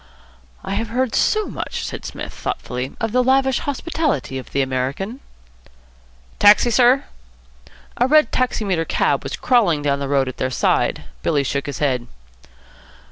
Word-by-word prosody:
"I - - -5
have 225 +3 -2
heard 250 +2 -1
so 430 -1 +2
much," - - -5
said - - -6
Psmith, - - -6
thoughtfully, 125 +1 -4
"of 225 - -1
the 250 +2 +3
lavish 265 0 +3
hospitality 290 - -2
of 130 - -11
the 140 - +1
American." 135 - -3 1.2
"Taxi, 210 +4 +6
sir?" 250 +3 +4 0.9
A 245 - +3
red 305 +2 +4
taximeter 205 -9 0
cab - - +1
was - - -5
crawling 190 - +2
down 140 -1 +1
the 140 -1 -4
road 135 -2 +2
at 130 - -6
their 130 - -1
side. 130 - +1 0.2
Billy 145 - +1
shook 140 +1 -2
his 145 - -4
head. 130 -4 -1
200 Hz, 150 wpm, -20 LUFS, -, 1.2 s, Taxi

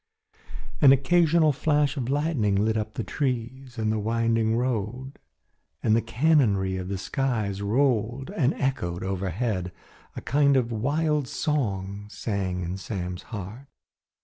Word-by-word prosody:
An 140 -3 +8
occasional 160 +3 +4
flash 145 0 +1
of 130 -4 -3
lightning 140 -8 +1
lit 110 +3 +1
up 110 0 -3
the 115 - -2
trees 130 0 -3
and 110 -1 0
the 110 - 0
winding 115 +1 +1
road, 125 +2 -3 0.6
and 110 - +4
the 115 - +3
cannonry 115 -6 +2
of 90 -1 -5
the 100 0 -3
skies 105 -3 -2
rolled 120 - 0
and 150 -9 +1
echoed 90 - -2
overhead. 95 0 -2 0.4
A - - -5
kind 140 0 +3
of 120 -2 0
wild 145 +5 0
song 105 -10 -2
sang 95 -5 -3
in 90 +2 -4
Sam's 90 -2 -5
heart. 110 +5 -7
115 Hz, 135 wpm, -26 LUFS, 100-135 Hz, 0.6 s, An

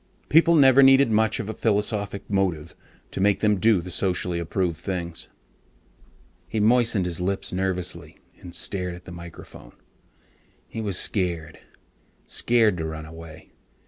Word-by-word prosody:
People 165 +2 +5
never 135 -3 +6
needed 135 -2 +6
much 110 0 +2
of 110 - -4
a 110 - -4
philosophic 105 -2 -2
motive 90 -6 -1 0.4
to - - -4
make 100 0 +2
them 105 -2 +2
do 110 -2 +3
the 90 +2 -8
socially 90 -1 -1
approved 85 0 -2
things. 85 -2 -6 1.2
He 110 - -2
moistened 115 -3 +3
his 90 -1 -3
lips 95 +1 -2
nervously 90 -1 -3 0.2
and 90 -1 -9
stared 90 -1 -3
at 90 - -14
the - - -10
microphone. 85 -8 -12 0.9
He 115 - -6
was 100 -4 -2
scared. 85 -5 -1 0.7
Scared 115 -5 +2
to 80 - -3
run 80 0 -6
away. 80 0 -12
95 Hz, 145 wpm, -24 LUFS, 85-110 Hz, 1.2 s, never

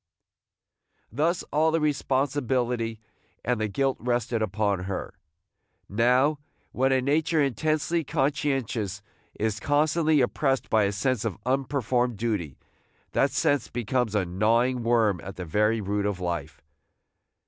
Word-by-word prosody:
Thus 160 - 0
all 155 +2 +3
the 165 +1 +1
responsibility 130 -5 0 0.5
and 120 -1 0
the 110 - +1
guilt 135 +6 0
rested 120 -1 -1
upon 100 -2 0
her. 95 -1 -4 0.7
Now, 125 +8 +2 0.3
when 135 +1 +1
a 130 -1 +2
nature 155 +3 +1
intensely 155 +5 +1
conscientious 135 - -1 0.4
is 110 0 -1
constantly 155 +3 +2
oppressed 135 +1 0
by 110 -2 +4
a 100 - 0
sense 105 +3 0
of 110 -5 -3
unperformed 125 -3 0
duty, 100 - -2 0.5
that - - +2
sense 145 -4 +1
becomes 120 -1 -1
a 100 -3 +2
gnawing 115 +8 +1
worm 115 -6 +2
at 100 +1 -7
the 90 - -6
very 105 +7 +1
root 100 +1 -1
of 100 -3 -2
life. 80 -4 -4
120 Hz, 125 wpm, -26 LUFS, 105-140 Hz, 0.7 s, by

